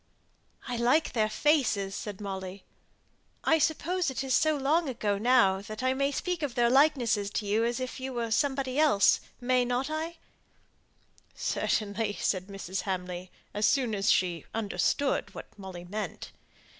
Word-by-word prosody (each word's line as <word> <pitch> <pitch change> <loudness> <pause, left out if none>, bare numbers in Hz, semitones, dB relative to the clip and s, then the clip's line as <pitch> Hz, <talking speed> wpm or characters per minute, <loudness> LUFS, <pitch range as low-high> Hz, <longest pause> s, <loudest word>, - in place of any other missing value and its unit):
"I 245 -1 -2
like 250 +7 +2
their 215 -3 +2
faces!" 225 -9 +1
said 205 -1 -6
Molly. 190 -1 -6 0.8
"I 320 - +4
suppose 335 +3 0
it 265 +1 -3
is 265 -1 -1
so 310 +3 +3
long 295 +3 +1
ago 210 -5 -1
now, 215 -5 +4
that 215 +4 -7
I 260 0 +2
may 275 +1 0
speak 355 +4 -2
of 280 -5 -3
their 240 -1 +3
likenesses 250 -8 +3
to 210 +1 -3
you 210 +3 +1
as 240 +2 0
if 255 0 -5
they 260 +1 -4
were 235 -3 -3
somebody 265 +2 0
else; 290 -11 +5 0.2
may 250 0 +2
not 245 +4 -1
I?" 320 +2 -3 1.2
"Certainly," 205 0 -1
said 185 -1 -1
Mrs. 195 -1 -4
Hamley, 180 -1 -4 0.2
as 210 +1 +2
soon 245 0 +1
as 200 0 +1
she 175 -3 +2
understood 225 +5 0
what - - -10
Molly 190 -3 -9
meant. 210 +4 -5
235 Hz, 155 wpm, -29 LUFS, 200-275 Hz, 1.2 s, else